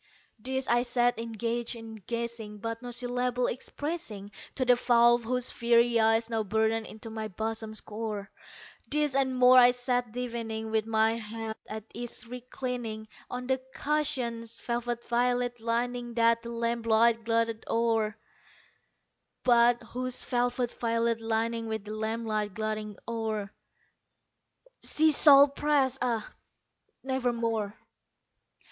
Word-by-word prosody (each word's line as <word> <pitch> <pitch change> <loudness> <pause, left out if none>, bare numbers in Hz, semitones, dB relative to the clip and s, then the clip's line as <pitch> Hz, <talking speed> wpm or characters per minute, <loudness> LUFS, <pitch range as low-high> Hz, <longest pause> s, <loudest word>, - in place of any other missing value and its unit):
This 260 +3 -2
I 240 0 +3
sat 240 -1 +1
engaged 230 +1 -3
in 225 -1 -9
guessing, 235 -3 -4
but 230 +2 -5
no 245 - -7
syllable 245 0 -1
expressing 250 - -4 0.2
To 260 - 0
the 250 0 +6
fowl 240 -1 +5
whose 250 +1 -1
fiery 235 0 +3
eyes 225 +1 +3
now 225 -1 -1
burned 220 +2 0
into 220 +1 -9
my 220 -1 -4
bosom's 220 +2 -3
core; 210 -2 -5 0.6
This 295 -1 +1
and 265 -1 +1
more 255 0 +8
I 245 0 +8
sat 245 -1 -1
divining, 230 -2 -4
with 220 0 0
my 220 0 +3
head 225 0 -5
at 215 0 -5
ease 240 +1 -6
reclining 245 -3 -5 0.2
On 250 0 -5
the 260 0 0
cushion's 240 -6 -1
velvet 240 0 -3
violet 245 0 +1
lining 240 +1 -2
that 230 0 +3
the 235 - -8
lamp 235 0 -2
light 230 +1 +4
gloated 230 -1 0
o'er, 225 -2 +1 1.3
But 240 -1 +4
whose 255 +2 -3
velvet 245 -1 0
violet 230 -1 0
lining 225 +1 -1
with 220 -2 -4
the 210 - -6
lamp 220 +1 -3
light 215 -2 -2
gloating 215 -1 -3
o'er, 220 -3 -3 1.3
She 315 0 +4
shall 285 -1 +8
press, 280 -2 +1
ah, 230 -3 -1 0.7
nevermore! 235 -5 -1
235 Hz, 130 wpm, -29 LUFS, 225-245 Hz, 1.3 s, more